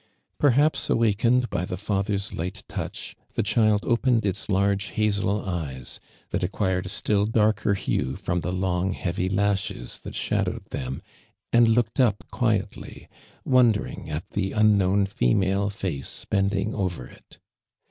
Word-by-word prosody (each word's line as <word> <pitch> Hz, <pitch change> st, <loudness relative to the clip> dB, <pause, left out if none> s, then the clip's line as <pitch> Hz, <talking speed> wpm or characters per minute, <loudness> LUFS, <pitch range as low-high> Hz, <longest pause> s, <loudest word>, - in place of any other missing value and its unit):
Perhaps, 145 Hz, +2 st, +3 dB
awakened 115 Hz, +3 st, +3 dB
by 85 Hz, -, -1 dB
the 90 Hz, 0 st, -4 dB
father's 100 Hz, 0 st, -1 dB
light 90 Hz, +5 st, -4 dB
touch, -, -, -5 dB, 0.2 s
the -, -, +1 dB
child 110 Hz, -1 st, +2 dB
opened 120 Hz, -2 st, +2 dB
its 100 Hz, +2 st, -2 dB
large 100 Hz, +1 st, +2 dB
hazel 105 Hz, -1 st, 0 dB
eyes, 75 Hz, -9 st, -5 dB, 0.3 s
that -, -, -1 dB
acquir 95 Hz, 0 st, 0 dB
ed -, -, -5 dB
a -, -, -5 dB
still 105 Hz, -1 st, +1 dB
darker 105 Hz, -2 st, +2 dB
hue 70 Hz, -7 st, -1 dB
from 85 Hz, 0 st, -2 dB
the 90 Hz, -, -2 dB
long 90 Hz, 0 st, 0 dB
heavy 90 Hz, +1 st, -2 dB
lashes 100 Hz, -10 st, -1 dB
that -, -, -9 dB
shadowed -, -, -1 dB
them, 65 Hz, +1 st, -4 dB, 0.5 s
and 120 Hz, 0 st, +6 dB
looked 115 Hz, +1 st, +1 dB
up 115 Hz, -6 st, +3 dB
quietly, 115 Hz, -5 st, -2 dB, 0.4 s
wondering 120 Hz, -9 st, +2 dB
at 75 Hz, +2 st, -4 dB
the 100 Hz, -1 st, -1 dB
trnknown 100 Hz, -2 st, +3 dB
female 95 Hz, +5 st, +1 dB
face 95 Hz, -9 st, -5 dB
bending 100 Hz, +1 st, 0 dB
over 90 Hz, -, -2 dB
it. -, -, -17 dB
100 Hz, 140 wpm, -25 LUFS, 90-110 Hz, 0.5 s, and